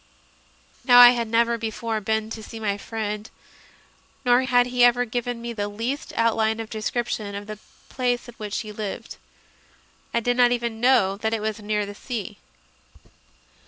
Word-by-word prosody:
Now 245 -2 +6
I 245 0 +11
had 235 -2 -1
never 235 +1 +2
before 225 0 -3
been 220 +1 -1
to 225 - -6
see 225 +1 -9
my 205 -2 -1
friend, 210 0 -5 1.0
nor 245 0 +5
had 245 -1 +4
he 250 0 +1
ever 245 0 +5
given 245 +1 -3
me 235 0 -4
the 205 -2 -3
least 230 +8 -4
outline 225 -1 +1
of 225 -1 -6
a - - -7
descrip 235 +2 -2
tion 200 -2 -4
of 200 0 -6
the 215 0 -8 0.3
place 245 -2 -1
in 240 - -10
which 210 -2 -4
he 215 - -8
lived. 210 -1 -6 0.9
I 235 - +1
did 245 +1 0
not 245 -1 +5
even 235 -2 -2
know 240 -7 +3
that 220 +2 -1
it - - -3
was 215 0 -3
near 210 0 -1
the 205 - -8
sea. 210 -2 -6
225 Hz, 180 wpm, -24 LUFS, 215-245 Hz, 1.0 s, I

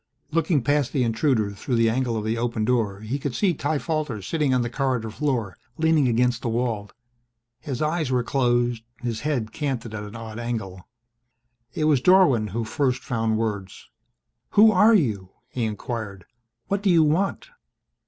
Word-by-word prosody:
Looking 160 -4 +1
past 145 -1 +1
the 130 - +2
intruder 115 -2 +1
through 100 +5 -3
the 115 0 +3
angle 120 -1 -1
of 105 - -3
the 110 +1 0
open 115 -2 -1
door 110 -5 0
he 120 +6 -3
could 135 -3 -4
see 195 -4 +2
Ty 145 0 -1
Falter 155 -7 -2
sitting 150 - 0
on 125 -1 +2
the - - -2
corridor 125 -4 -1
floor, 120 -7 -2 0.2
leaning 160 -4 +3
against 120 0 +1
the 120 - -2
wall. 115 -3 -2 0.7
His 140 -1 -4
eyes 155 -2 0
were 125 -1 +1
closed, 120 -2 +1 0.2
his 115 -3 -2
head 130 -7 -2
canted 120 -3 -3
at 110 - -4
an 105 +2 -9
odd 110 0 -7
angle. 105 -6 -5 0.9
It 155 - -1
was 150 -4 +3
Dorwin 145 - +5
who 115 +4 -3
first 130 +2 -1
found 115 -2 0
words. 105 -4 -4 0.7
"Who 215 +1 +8
are 215 +3 +5
you?" 105 - 0 0.2
he 125 -2 -2
inquired. 105 -3 -5 0.4
"What 200 +5 -1
do 205 - +1
you 170 -3 +5
want?" 180 - 0
120 Hz, 175 wpm, -24 LUFS, 110-150 Hz, 0.9 s, Who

